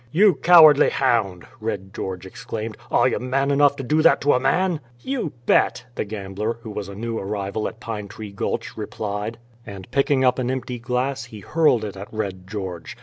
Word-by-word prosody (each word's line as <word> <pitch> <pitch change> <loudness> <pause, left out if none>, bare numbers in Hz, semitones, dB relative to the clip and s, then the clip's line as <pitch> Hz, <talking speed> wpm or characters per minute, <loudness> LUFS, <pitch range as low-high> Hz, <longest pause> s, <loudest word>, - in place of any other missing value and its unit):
"You 195 +5 +5
cowardly 155 -2 +7
hound!" 105 -9 0
Red 100 -3 -4
George 95 -1 -5
exclaimed. 110 +3 -6
"Are - - +4
you - - 0
man 135 +3 0
enough 140 0 +4
to 140 - -6
do 150 +5 +2
that 165 - +5
to 145 - +4
a 125 - +3
man?" 170 +6 +1 0.2
"You 260 - -3
bet," - - +2
the - - -3
gambler, 105 +2 -4
who 110 - -7
was 100 -1 -5
a 100 - -8
new 115 +2 -3
arrival 100 +1 -3
at 110 - -9
Pine 105 -2 -5
Tree 105 +1 -9
Gulch, 100 - -3
replied; 105 +1 -4 0.3
and 95 -4 -10
picking 140 -1 +2
up 125 +1 +3
an 125 -1 -1
empty 130 -1 -3
glass, 125 +1 -2
he 110 -3 -11
hurled 150 - +2
it 100 - -6
at 100 +2 -9
Red 95 -4 -4
George. 95 -4 -6
115 Hz, 195 wpm, -23 LUFS, 100-135 Hz, 0.3 s, cowardly